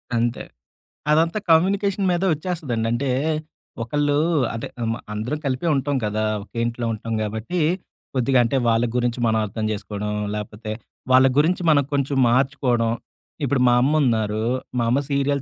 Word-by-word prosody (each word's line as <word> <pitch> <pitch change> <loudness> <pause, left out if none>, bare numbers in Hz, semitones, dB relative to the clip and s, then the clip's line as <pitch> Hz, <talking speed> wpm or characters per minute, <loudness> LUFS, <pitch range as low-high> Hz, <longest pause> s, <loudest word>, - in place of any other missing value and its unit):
అంతే. 115 +1 0 0.7
అదంతా 165 +6 +3
కమ్యూనికేషన్ 195 +4 +3
మీదే 175 +2 +1
ఒచ్చేస్తదండి. 150 -9 -2
అంటే, 130 +3 0 0.7
ఒకళ్ళూ 145 +3 +1 0.4
అంటే 115 - -4 0.2
అమ 115 0 0 0.2
అందరం 115 +8 -2
కలిపే 130 +5 -1
ఉంటాం 140 +1 0
కదా! 110 +1 -1 0.2
ఒకే 115 +2 -7
ఇంట్లో 120 0 -3
ఉంటాం 115 +1 -5
గాబట్టి, 110 - -2 0.5
కొద్దిగా 130 0 +3
అంటే 125 +4 0
వాళ్ళ 115 +1 +3
గురించి 120 0 0
మనం 110 0 +2
అర్థం 110 +2 -4
జేసుకోడం, 105 0 -4 0.2
లాపోతే 105 +1 -6 0.4
వాళ్ళ 130 +1 +7
గురించి 170 +5 +3
మనం 145 -2 +5
కొంచెం 140 0 0
మార్చుకోవడం 125 -2 +1 0.5
ఇప్పుడు 135 -1 +1
మా 120 - +5
అమ్మ 140 +4 +2
ఉన్నారు, 110 -3 +1 0.3
మా 120 - +2
అమ్మ 130 +4 +3
సీరియల్ 140 0 +1
125 Hz, 145 wpm, -22 LUFS, 115-145 Hz, 0.7 s, వాళ్ళ